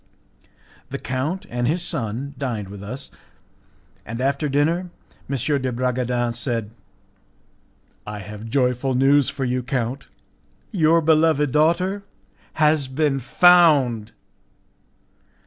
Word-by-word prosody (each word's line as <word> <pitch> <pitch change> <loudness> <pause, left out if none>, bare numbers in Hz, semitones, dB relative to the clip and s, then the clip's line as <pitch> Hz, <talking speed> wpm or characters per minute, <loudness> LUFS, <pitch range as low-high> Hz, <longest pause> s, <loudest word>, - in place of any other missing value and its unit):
The - - -4
count 145 +9 -3
and 120 0 -2
his 170 +5 0
son 135 -3 -3
dined 120 -8 -4
with 100 0 -9
us, 125 +7 -7 0.9
and 115 0 -6
after 140 +3 0
dinner 165 +6 +1 0.4
M. 140 +1 0
de 130 -1 -1
Bragadin 125 -1 -1
said, 115 -3 -2 1.4
"I 105 0 -5
have 105 +2 -8
joyful 125 0 +1
news 135 +1 +4
for 140 -1 -3
you, 125 +1 -1
count; 125 +1 -3 0.6
your 165 -4 +3
beloved 155 -2 +3
daughter 170 +7 +1 0.5
has 150 -3 +2
been 135 +1 0
found!" 140 -8 +4
135 Hz, 110 wpm, -22 LUFS, 120-155 Hz, 1.4 s, news